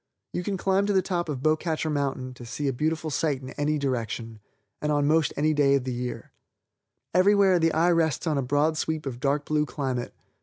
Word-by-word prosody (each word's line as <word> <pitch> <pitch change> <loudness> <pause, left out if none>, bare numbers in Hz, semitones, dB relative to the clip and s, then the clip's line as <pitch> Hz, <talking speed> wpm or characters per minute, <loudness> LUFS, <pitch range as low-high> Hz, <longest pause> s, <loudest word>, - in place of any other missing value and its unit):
You - - -1
can 195 +2 -2
climb 195 +2 +1
to 205 - +1
the 190 -1 +3
top 175 -3 -2
of 135 -3 -4
Beaucatcher 155 0 0
Mountain 135 -3 -2
and 120 - -9
see 145 +4 -3
a 135 - +1
beautiful 155 +4 -1
sight 140 -2 0
in 130 - -7
any 150 +1 0
direction, 115 -4 -3 0.4
and 150 - 0
on 145 -1 +2
most 155 +1 +3
any 155 +2 +2
day 140 -2 +4
of 135 - 0
the 130 -1 -3
year. 125 0 -5 0.8
Every 185 +4 +5
where 190 -3 +4
the 165 0 +3
eye 165 +3 +3
rests 165 -2 +1
on 155 -2 +1
a - - +1
broad 145 +4 +1
sweep 160 -2 -2
of 125 -3 -5
dark 140 +2 0
blue 150 0 +1
climate. 130 -5 -3
150 Hz, 220 wpm, -26 LUFS, 135-160 Hz, 0.8 s, Every